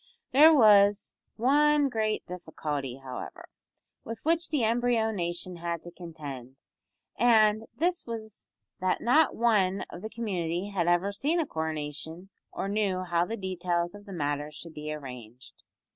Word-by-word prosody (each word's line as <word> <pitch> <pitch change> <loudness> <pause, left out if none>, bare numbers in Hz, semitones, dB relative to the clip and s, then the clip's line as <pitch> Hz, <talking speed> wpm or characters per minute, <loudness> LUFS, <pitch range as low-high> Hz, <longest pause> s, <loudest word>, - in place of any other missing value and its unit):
There 300 +5 +8
was 205 -6 +5 0.2
one 290 +4 +4
great 220 -4 -1
difficulty, 150 -7 -5
however, 130 -1 -8 0.6
with 230 0 -6
which 335 +1 +1
the 290 -6 0
embryo 230 0 +2
nation 175 -2 -3
had 170 -1 -4
to 175 - -9
contend, 145 -7 -9 0.6
and 220 -2 +4
this 350 -1 -1
was 220 - -8 0.3
that 185 0 0
not 295 +6 +4
one 200 -5 +2
of 175 - -8
the 220 - -5
community 190 -5 -3
had 180 -4 -1
ever 175 +3 +2
seen 290 +12 0
a 325 - +1
coronation, 160 - -5 0.2
or - - -4
knew 200 -3 0
how 175 -1 +1
the 230 - -4
details 175 -2 -2
of 205 0 -13
the - - -8
matter 145 -3 -2
should 160 +2 -10
be 150 0 -6
arranged. 125 -5 -10
190 Hz, 145 wpm, -28 LUFS, 165-225 Hz, 0.6 s, There